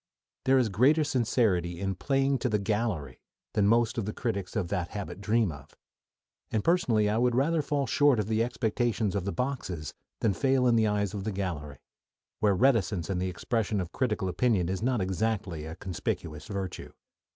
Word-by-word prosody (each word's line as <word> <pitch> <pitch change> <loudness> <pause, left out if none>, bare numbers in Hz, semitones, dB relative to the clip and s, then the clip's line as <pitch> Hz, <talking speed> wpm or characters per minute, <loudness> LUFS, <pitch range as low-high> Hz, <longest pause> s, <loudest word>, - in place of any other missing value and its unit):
"] - - -60
There 135 0 +5
is 125 -4 +3
greater 140 +10 +4
sincerity 110 - +1
in 95 0 -1
"playing 135 +6 +1
to 125 - 0
the 105 - +2
gallery" 100 - -2 0.3
than 100 -1 +3
most 115 +2 +3
of 110 - -2
the 105 - -3
critics 100 -6 -3
of 95 -6 -1
that 90 -2 -1
habit 100 -1 -6
dream 105 -1 +2
of, 75 -1 -12 0.7
and 110 - -1
personally 120 -12 +3
I 105 +2 +1
would 120 -1 +2
rather 155 +5 +2
fall 145 -1 -1
short 145 +1 +4
of 105 - 0
the 110 +2 +1
expectations 115 -3 0
of 100 -3 -2
the 100 - -1
boxes 115 - -3 0.3
than 110 -3 +2
fail 130 +5 +2
in 120 -2 +4
the 110 -1 +3
eyes 100 -2 0
of 100 -2 -4
the 110 - -2
gallery, 85 -8 -4 0.6
where 105 -2 +3
reticence 105 -7 +2
in 90 - -1
the 95 0 -1
expression 105 +3 -1
of 90 -2 -4
critical 105 -6 -1
opinion 90 -1 +1
is 95 +1 -2
not 125 -2 +1
exactly 95 -4 -2
a 80 - -7
conspicuous 80 -4 -4
virtue. 95 -3 -5
105 Hz, 190 wpm, -29 LUFS, 95-120 Hz, 0.7 s, There